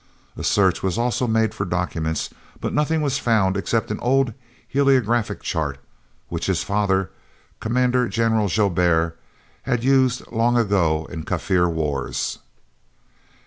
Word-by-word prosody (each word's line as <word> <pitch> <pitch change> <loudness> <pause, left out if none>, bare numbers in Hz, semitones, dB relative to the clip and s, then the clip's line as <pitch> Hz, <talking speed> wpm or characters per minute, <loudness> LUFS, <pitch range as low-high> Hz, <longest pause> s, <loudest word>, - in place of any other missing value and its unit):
A - - -7
search 95 -4 +2
was 95 0 -1
also 120 +1 0
made 110 -1 +1
for - - -3
documents, 85 -4 -2 0.3
but - - -3
nothing 150 +1 +1
was 140 -1 0
found 105 -5 +2
except 110 +3 -1
an 105 - -3
old 130 -1 +2 0.3
heliographic 120 -6 +2
chart 75 -5 -2 0.5
which 85 +2 -4
his 95 -3 0
father, 100 -2 0 0.5
Commandant 125 +1 +1
General 110 -2 +2
Joubert, 85 -4 +2 0.5
had 125 -3 -1
used 130 -1 +3
long 120 +1 +2
ago 85 -8 +1
in 80 -3 -5
Kaffir 90 +1 +1
wars. 75 -4 -2
105 Hz, 130 wpm, -22 LUFS, 90-120 Hz, 0.5 s, used